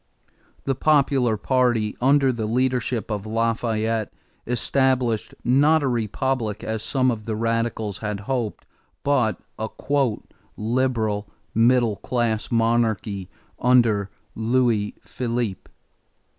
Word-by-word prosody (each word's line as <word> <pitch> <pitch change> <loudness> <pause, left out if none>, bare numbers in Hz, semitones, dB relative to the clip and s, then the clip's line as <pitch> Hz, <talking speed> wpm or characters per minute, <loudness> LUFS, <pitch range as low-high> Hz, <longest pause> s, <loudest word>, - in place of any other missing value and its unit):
The 135 - 0
popular 135 -5 +2
party, 120 -3 +1
under 135 +1 +4
the 115 -3 -3
leadership 125 -1 0
of 105 0 -3
Lafayette, 115 -1 0 0.4
established, 125 -1 +1
not 145 +5 +4
a - - +1
republic 115 -1 -1
as 110 -1 -3
some 130 +2 +1
of 110 -3 -5
the 110 - -2
radicals 115 -2 -1
had 105 -2 -3
hoped, 120 -2 -3 0.4
but 125 -8 +1 0.2
a 110 0 -2 0.9
"liberal" 110 -3 0 0.2
middle 115 -2 +3
class 115 -3 -1
monarchy 115 -4 0 0.3
under 115 -5 +3 0.2
Louis 115 -2 +1
Philippe. 120 -5 -3
115 Hz, 105 wpm, -23 LUFS, 110-130 Hz, 0.9 s, under